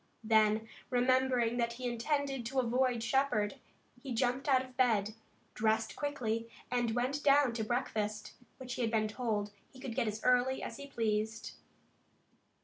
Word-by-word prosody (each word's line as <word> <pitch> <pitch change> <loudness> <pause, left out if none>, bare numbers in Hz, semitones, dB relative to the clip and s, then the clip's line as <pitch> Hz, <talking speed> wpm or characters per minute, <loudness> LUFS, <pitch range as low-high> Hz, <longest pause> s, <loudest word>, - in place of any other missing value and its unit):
Then, 220 0 +3 0.2
remembering 250 -1 +2
that 235 -1 0
he 250 +1 -4
intended 270 +2 -1
to 265 +2 0
avoid 250 -1 +1
Shepard, 265 -2 +1 0.4
he 255 -3 -4
jumped 250 +4 0
out 260 -1 +4
of 255 -1 -17
bed, 220 -5 +2 0.4
dressed 220 0 0
quickly 230 -6 -2 0.2
and 240 -2 +1
went 260 +4 -1
down 280 -3 +5
to 225 -1 -2
breakfast, 215 -3 -2 0.2
which 250 -1 -6
he - - -3
had 230 - +1
been 220 -1 +1
told 215 -2 -2 0.2
he 260 - -15
could 260 -3 -5
get 240 -1 0
as 215 +1 -4
early 250 +1 +3
as - - -6
he 280 - -8
pleased. 220 -3 -2
240 Hz, 155 wpm, -33 LUFS, 220-260 Hz, 0.4 s, down